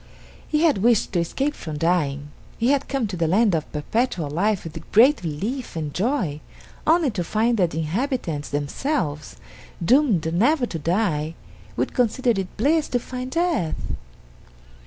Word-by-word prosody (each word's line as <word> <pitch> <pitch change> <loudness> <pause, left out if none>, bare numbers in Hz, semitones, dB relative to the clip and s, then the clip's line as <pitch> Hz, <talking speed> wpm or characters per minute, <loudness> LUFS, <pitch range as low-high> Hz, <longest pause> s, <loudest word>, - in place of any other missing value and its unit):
He 305 +1 +1
had 305 -11 +4
wished 230 0 +2
to 175 - +2
escape 270 - -1
from 155 - -6
dying. 145 -4 0 0.3
He 235 +2 +1
had 280 0 +2
come 270 -4 -1
to 200 -3 -4
the 165 -2 0
land 205 +4 +3
of 155 -2 -2
Perpetual 165 - -1
Life 195 +5 +1
with 160 -1 -9
great 255 +8 +6
relief 205 - -4
and 155 -3 -3
joy, 190 - -1 0.5
only 320 -4 +4
to 185 -4 -2
find 225 +7 +1
that 180 -4 +3
the 160 - -6
inhabitants 170 - -2
themselves, 150 - -2 0.5
doomed 220 - +3
never 245 - +3
to 165 -8 -5
die, 165 -2 0 0.4
would 125 - -1
consider 250 +1 +2
it 195 -4 -3
bliss 300 +6 +2
to 245 - +1
find 255 +1 -6
death. 330 - 0
205 Hz, 155 wpm, -23 LUFS, 160-255 Hz, 0.5 s, great